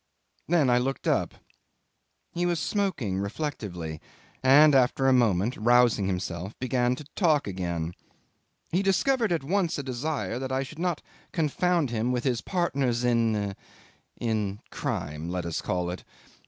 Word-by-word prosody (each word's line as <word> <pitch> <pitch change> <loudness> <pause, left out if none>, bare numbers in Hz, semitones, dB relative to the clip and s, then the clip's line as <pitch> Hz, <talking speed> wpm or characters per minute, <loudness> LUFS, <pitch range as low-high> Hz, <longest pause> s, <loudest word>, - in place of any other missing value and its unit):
Then 160 -4 +3
I 120 - +4
looked 135 +2 -2
up. - - +1 1.0
He 175 +1 0
was 175 -2 0
smoking 155 - -1
reflectively, 100 - -4 0.4
and 145 +3 +7
after 135 0 +3
a 130 - +5
moment, 115 -2 +2
rousing 120 -3 +4
himself, 90 +1 -4
began 125 -1 +1
to 150 - -9
talk 155 -7 +3
again. 85 -3 -3 0.8
He 180 - +2
discovered 225 +4 +2
at 165 -4 0
once 175 +2 0
a 145 - -3
desire 130 -1 -3
that 130 0 -4
I 130 +1 0
should 150 +4 -10
not 175 -3 -1 0.3
confound 165 -2 +1
him 120 +2 0
with 125 -1 -1
his 125 -4 0
partners 135 -10 0
in 110 -4 +1 0.6
in 105 -4 -1
crime, 75 +3 -3
let 90 -1 -3
us 85 - -2
call 90 -1 -1
it. 90 - -7
125 Hz, 145 wpm, -27 LUFS, 100-155 Hz, 1.0 s, and